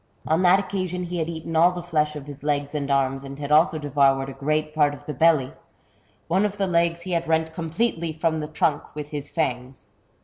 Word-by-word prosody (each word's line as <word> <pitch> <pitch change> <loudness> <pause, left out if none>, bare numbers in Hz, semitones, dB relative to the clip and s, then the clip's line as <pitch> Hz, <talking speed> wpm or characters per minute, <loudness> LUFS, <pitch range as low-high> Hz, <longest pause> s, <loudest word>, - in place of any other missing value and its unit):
On 160 +3 +2
that 185 +1 +6
occasion 185 -2 -3
he 175 0 -4
had 160 0 -1
eaten 165 0 -5
all 170 +3 +6
the 175 -1 -6
flesh 150 -3 0
off 145 -2 -7
his 145 -1 -10
legs 145 0 -1
and 145 -2 -3
arms, 135 -1 +1
and 135 0 -8
had 145 0 -5
also 155 +2 +5
devoured 135 -2 +2
a - - -7
great 155 +2 -1
part 145 -2 +2
of - - -16
the 150 - -4
belly; 145 -2 +3 0.7
one 185 +4 +2
of 205 -1 -1
the 200 - +1
legs 170 -1 +1
he 185 - -6
had 170 -1 0
rent 160 0 +1
completely 165 0 -1
from 160 0 -1
the 150 - -4
trunk 150 -1 -1
with 150 -1 -6
his 145 -2 -5
fangs. 130 -5 -3
155 Hz, 225 wpm, -24 LUFS, 145-170 Hz, 0.7 s, that